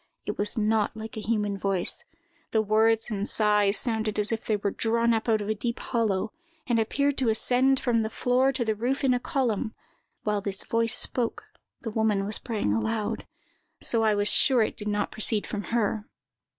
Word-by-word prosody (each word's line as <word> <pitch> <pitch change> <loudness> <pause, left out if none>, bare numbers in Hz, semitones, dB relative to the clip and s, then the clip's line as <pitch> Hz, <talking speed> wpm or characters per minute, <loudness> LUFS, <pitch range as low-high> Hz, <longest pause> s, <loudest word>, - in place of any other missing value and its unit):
It - - -3
was 205 +3 -2
not 220 0 +1
like 220 0 -7
a - - -4
human 210 -2 -1
voice. 190 -2 0 0.5
The 220 - +2
words 220 +2 +2
and 205 0 0
sighs 210 -1 +3
sounded 220 -3 -1
as 210 +1 -1
if 225 -1 -2
they 215 - 0
were 200 0 -2
drawn 230 +2 +1
up 225 +1 -1
out 220 -1 +2
of 205 - -4
a 215 - +1
deep 235 +3 -3
hollow, 220 -2 -1 0.3
and 235 -2 +1
appeared 280 +5 0
to 255 -4 +2
ascend 255 +4 +2
from 235 -2 +1
the 220 - -2
floor 250 +4 +2
to 255 -3 -1
the 220 - +1
roof 245 +6 -2
in 260 -2 +4
a 250 - +1
column; 245 -7 -1 0.5
while 210 -1 0
this 195 -1 -4
voice 230 0 +1
spoke, 240 -3 +1 0.4
the 230 -4 -5
woman 215 -3 +1
was 210 +1 +1
praying 215 - -1
aloud: 215 - -2 0.5
so 230 - +2
I 215 -1 +3
was 205 0 +1
sure 250 0 +4
it - - -3
did 210 - -6
not 210 0 -1
proceed 215 -1 +1
from 205 -2 -5
her. 220 0 -1
220 Hz, 200 wpm, -26 LUFS, 210-235 Hz, 0.5 s, in